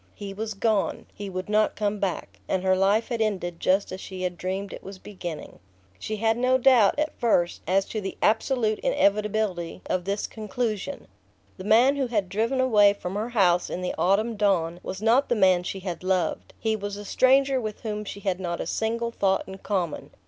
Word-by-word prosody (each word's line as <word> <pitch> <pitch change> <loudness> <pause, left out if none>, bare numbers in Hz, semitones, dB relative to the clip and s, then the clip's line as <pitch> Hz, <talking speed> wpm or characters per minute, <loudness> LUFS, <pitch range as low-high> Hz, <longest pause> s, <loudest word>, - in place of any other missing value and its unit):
He 200 -1 -7
was 215 +1 -4
gone; 215 -1 0
he 205 -1 -7
would 185 0 -5
not 215 +1 +2
come 210 0 -1
back; 195 -3 -3
and 190 -1 -1
her 185 0 +3
life 200 +5 +2
had 235 -2 -2
ended 180 -6 -1
just 195 +2 +1
as 185 +1 -6
she 185 -1 -7
had 180 -1 -2
dreamed 190 +3 -4
it - - -8
was 195 0 -9
beginning. 180 -5 -8 0.4
She 215 - -4
had 225 +1 +1
no 255 +1 +3
doubt, 250 -5 +5
at 305 +1 -1
first, 175 -7 +1
as 195 +1 +2
to 215 - -3
the 195 - -5
absolute 220 -1 +1
inevitability 210 - 0
of 180 -1 -1
this 200 +1 -1
conclusion. 215 -3 -4 0.5
The 185 - -8
man 245 +6 +5
who 270 -2 0
had 210 -6 -1
driven 225 +7 0
away 210 -6 +5
from 185 -2 -6
her 215 +4 -2
house 180 -7 +2
in 180 - -4
the 180 - -2
autumn 215 +5 +1
dawn 175 -5 +1
was 190 +3 -6
not 240 +5 +3
the 240 - +2
man 185 -4 +4
she 190 +2 -5
had 180 -2 -5
loved; 185 -1 -1
he 220 -1 0
was 205 -1 -5
a 205 - -8
stranger 265 +3 +3
with 215 -2 -5
whom 210 -2 -3
she 200 -1 -8
had 190 -2 -1
not 170 -2 -3
a - - -3
single 230 +1 -1
thought 195 -4 +1
in 190 0 -9
common. 185 -7 -2
205 Hz, 205 wpm, -25 LUFS, 185-225 Hz, 0.5 s, doubt